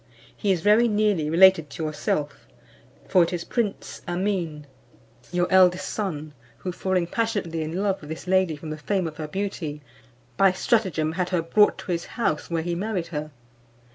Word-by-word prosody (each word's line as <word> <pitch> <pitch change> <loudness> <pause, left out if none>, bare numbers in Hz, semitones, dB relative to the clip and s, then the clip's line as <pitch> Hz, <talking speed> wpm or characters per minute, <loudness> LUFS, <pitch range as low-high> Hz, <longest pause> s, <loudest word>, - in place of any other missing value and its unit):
He 205 - 0
is 180 -3 +1
very 215 +5 +5
nearly 205 -8 +1
related 170 -2 +6
to 160 - -6
yourself, 150 -1 -2 0.6
for 185 - +4
it 170 - +2
is 175 -2 -3
prince 220 -2 -3
Amin, 175 -4 -2 0.7
your 175 0 +1
eldest 185 0 +4
son, 155 -8 -4 0.2
who 185 - -4
falling 185 0 0
passionately 200 -5 -2
in 165 +5 -2
love 195 -2 0
with 150 - -11
this 160 +3 -6
lady 185 -3 +2
from 155 +1 -8
the 155 - -5
fame 190 +3 -1
of 155 -2 -6
her 155 - -4
beauty, 160 -5 -4 0.5
by 195 -2 +5
stratagem 185 -7 +1
had 180 +2 -2
her 175 -3 0
brought 210 +5 +4
to 185 - -6
his 170 -1 -2
house, 195 -10 0
where 165 -1 -1
he 175 +1 -2
married 185 -1 -2
her. 150 0 -3
180 Hz, 175 wpm, -25 LUFS, 160-195 Hz, 0.7 s, related